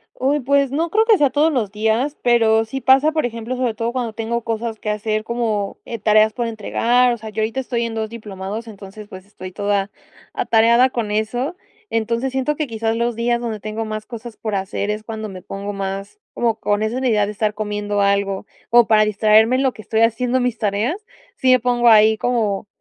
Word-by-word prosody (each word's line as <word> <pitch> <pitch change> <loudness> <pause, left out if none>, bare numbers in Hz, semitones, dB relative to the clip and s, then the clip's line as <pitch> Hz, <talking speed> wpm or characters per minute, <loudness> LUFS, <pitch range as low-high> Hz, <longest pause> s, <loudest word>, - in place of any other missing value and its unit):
Uy, 280 +2 0
pues, 280 +1 +2
no 325 +4 -1
creo 440 +4 +3
que 445 -3 +5
sea 285 -2 +3
todos 305 +4 +2
los 215 -6 -1
días, 220 +7 0
pero 225 -2 +3
sí 270 +4 -5
pasa, 270 +4 +5
por 310 -5 0
ejemplo, 230 +1 -4
sobre 250 -3 -1
todo 230 +2 -3
cuando 245 -3 -2
tengo 230 +1 -3
cosas 225 -1 -3
que 210 - -4
hacer, 215 +1 -1
como, 225 -4 -2
eh, 230 - -5
tareas 215 +1 +4
por 240 -2 -2
entregar, 240 +3 +1
o - - -4
sea, 220 0 -8
yo 220 +1 -3
ahorita 225 +4 -1
estoy 240 -2 -2
en 225 -1 -5
2 220 -1 -3
diplomados, 215 0 -7
entonces, 205 0 -11
pues, 185 -1 -11
estoy 185 -2 -10
toda 205 -1 -1 0.4
atareada 235 +3 +4
con 230 -4 -3
eso. 240 +9 -1 0.4
Entonces, 230 +3 -1
siento 265 +3 0
que 300 -1 -2
quizás 225 0 -2
los 235 0 0
días 235 +1 0
donde 225 -3 -4
tengo 215 +2 -4
más 215 0 -5
cosas 235 -1 -9
por 215 -2 -4
hacer 195 +1 -3
es 210 0 -3
cuando 220 -1 -6
me 185 -1 -9
pongo 200 +2 -6
más 195 - -5
como 230 -2 0
con 205 +1 0
esa 220 +3 -1
una 260 0 0
idea 210 -3 +3
de 210 - -4
estar 210 0 -1
comiendo 205 -1 -2
algo, 200 0 0 0.2
o 240 -1 +5
para 215 -1 +5
distraerme 215 +3 +4
en 270 - +1
lo 260 - +1
que 215 - -11
estoy 220 +2 -1
haciendo 245 +3 +2
mis 245 -2 -1
tareas, 215 - 0 0.4
si 260 -1 +3
me 255 - +6
pongo 240 0 +1
ahí 220 0 +6
como, 215 -5 -1
225 Hz, 215 wpm, -20 LUFS, 210-245 Hz, 0.4 s, me